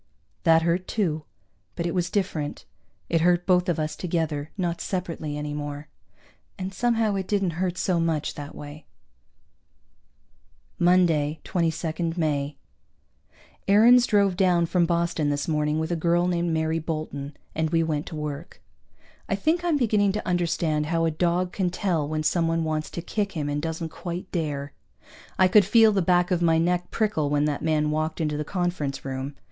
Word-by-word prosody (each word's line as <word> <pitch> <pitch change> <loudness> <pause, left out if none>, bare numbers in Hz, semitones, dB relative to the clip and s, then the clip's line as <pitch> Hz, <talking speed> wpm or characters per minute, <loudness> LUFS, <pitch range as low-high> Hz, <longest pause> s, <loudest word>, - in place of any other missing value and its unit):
That 165 -1 +5
hurt, 170 +2 0
too, 160 -8 -1 0.5
but 170 - -3
it 170 - -1
was 180 -1 0
different. 180 -7 -2 0.4
It 165 -1 +1
hurt 175 +1 +3
both 180 0 +3
of 170 - +1
us 155 -1 -2
together, 160 -4 -2
not 175 -3 -2
separately 165 -5 -3
any 150 0 -4
more. 145 0 -5 0.7
And 190 0 -5
somehow 225 0 +1
it 190 -1 -2
didn't 195 -4 +1
hurt 180 -1 -1
so 180 -2 +1
much 160 -3 0
that 145 0 -8
way. 145 +1 -10 1.9
Monday, 165 -4 +3
22 165 -1 -1
May. 145 -3 -1 1.1
Aarons 235 +5 +6
drove 200 -3 +3
down 180 -3 +3
from 170 0 +2
Boston 170 -3 0
this 145 -1 -1
morning 150 -1 0
with 160 +2 -2
a - - +1
girl 170 +2 +2
named 175 -1 0
Mary 160 0 0
Bolton, 155 -3 -5 0.2
and 160 0 0
we 165 0 +2
went 155 -2 -2
to 160 - -6
work. 150 +1 -6 0.7
I - - +2
think 335 +3 +1
I'm 340 -4 +2
beginning 210 -6 +2
to 210 0 -4
understand 165 -4 0
how 165 0 +1
a 165 - +1
dog 175 +3 0
can 185 -2 0
tell 175 -5 -1
when 155 0 -2
someone 165 0 +1
wants 155 -1 -2
to 170 - -6
kick 200 +1 -2
him 150 -3 -2
and 145 0 -1
doesn't 160 +1 -3
quite 175 +3 -6
dare. 145 -4 -3 0.6
I 185 - +5
could 205 +2 +6
feel 220 +3 +5
the 200 -2 +1
back 175 +1 +2
of 175 -1 +1
my 165 -1 +4
neck 175 +2 0
prickle 205 -10 0
when 145 0 +2
that 150 -2 -1
man 150 -1 +1
walked 155 +1 -2
into 150 -2 -1
the 150 - -2
conference 175 -6 -2
room. 135 +1 -4
165 Hz, 175 wpm, -25 LUFS, 155-180 Hz, 1.9 s, Aarons